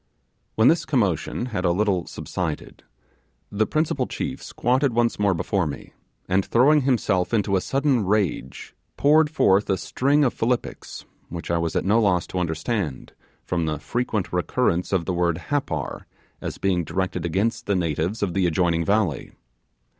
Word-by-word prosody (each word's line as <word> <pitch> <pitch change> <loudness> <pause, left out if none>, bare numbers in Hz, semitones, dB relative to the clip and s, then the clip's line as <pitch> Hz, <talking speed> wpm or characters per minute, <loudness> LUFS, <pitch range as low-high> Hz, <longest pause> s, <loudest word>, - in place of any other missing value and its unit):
When 110 +2 +4
this 165 - +4
commotion 105 - 0
had 90 -3 -1
a 90 - +3
little 95 -1 0
subsided, - - -5 0.7
the 110 +2 +1
principal 150 -4 0
chief 135 0 -4
squatted 130 +2 0
once 120 -1 +1
more 100 -2 +2
before 90 +1 0
me, 70 - -8 0.3
and 95 +1 +2
throwing 145 +8 +4
himself 115 -7 +1
into 100 -2 +1
a 95 - +2
sudden 135 -2 +1
rage, 95 -9 -1 0.2
poured 150 +2 +4
forth 100 -9 +3
a 95 - +2
string 140 +8 +1
of 125 - +2
philippics, 120 +2 -3 0.2
which 85 0 -5
I 85 - +1
was 85 -1 -2
at - - 0
no 110 +4 +4
loss 90 -5 +2
to 90 - 0
understand, 85 - -3 0.3
from 85 -3 -1
the 75 -1 -1
frequent 105 - -2
recurrence 90 0 0
of 95 -4 +1
the 95 - -1
word 85 -2 +1
Happar, 80 - -2 0.3
as - - -5
being 90 -3 +1
directed 90 0 -2
against 95 +7 -1
the 100 - +2
natives 85 +4 -1
of 90 -4 -1
the 95 -1 +2
adjoining 85 -1 +1
valley. 95 - 0
95 Hz, 160 wpm, -24 LUFS, 85-120 Hz, 0.7 s, When